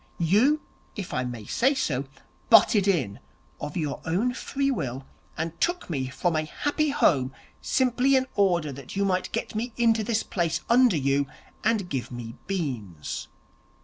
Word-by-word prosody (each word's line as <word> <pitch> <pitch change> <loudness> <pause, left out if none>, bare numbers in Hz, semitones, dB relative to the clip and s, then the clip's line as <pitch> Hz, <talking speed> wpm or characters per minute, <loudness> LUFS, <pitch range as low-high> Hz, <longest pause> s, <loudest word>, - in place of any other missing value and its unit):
You, 220 - +3 0.3
if 200 -4 -5
I 125 - 0
may 120 -4 -6
say 265 - +2
so, 140 - -1 0.4
butted 210 -2 +6
in 130 - +1 0.4
of 150 +3 -5
your 150 -4 -2
own 200 +10 0
free 275 +2 -1
will, 135 - -3 0.3
and 165 +1 -4
took 350 - 0
me 135 -4 -1
from 130 +6 -1
a 155 - +1
happy 290 - -1
home, 135 - +2 0.3
simply 260 +1 +2
in 260 0 +3
order 175 -7 +2
that 135 +4 -9
you 200 0 +1
might 185 -1 0
get - - -3
me 225 +2 -3
into 230 -2 +3
this 220 0 0
place 170 -4 -1
under 240 -7 +5
you, 140 0 +1 0.4
and 215 -4 +1
give 135 -7 -3
me 120 -2 -6
beans. 120 - -4
175 Hz, 160 wpm, -26 LUFS, -, 0.4 s, butted